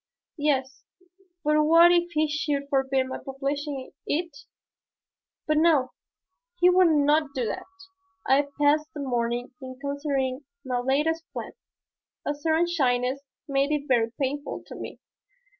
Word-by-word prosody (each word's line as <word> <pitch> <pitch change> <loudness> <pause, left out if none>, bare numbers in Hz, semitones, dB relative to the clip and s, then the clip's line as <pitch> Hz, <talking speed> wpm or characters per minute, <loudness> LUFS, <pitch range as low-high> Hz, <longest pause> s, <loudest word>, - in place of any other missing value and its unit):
Yes, 270 -3 0 0.6
but 300 0 +3
what 335 +3 +7
if 345 0 +2
he 310 0 +2
should 295 -2 -2
forbid 270 -1 +2
my 260 - -6
publishing 275 0 -4 0.2
it? 330 0 -2 1.1
But 305 0 +1
no, 305 -5 +3 0.7
he 360 +1 +6
would 365 0 +5
not 295 -1 +2
do 255 -3 0
that. - - -4 0.6
I 280 +2 +3
passed 300 +2 +3
the - - -5
morning 240 -1 -2
in 255 -1 -8
considering 280 -2 -2 0.3
my 250 -1 -1
latest 300 +6 0
plan. - - -5 0.7
A 290 - 0
certain 315 +3 +1
shyness 260 -5 0 0.3
made 275 0 +1
it 295 -1 -1
very 230 -3 +2
painful 285 +1 -3
to - - -10
me. - - -8
285 Hz, 135 wpm, -26 LUFS, 265-305 Hz, 1.1 s, what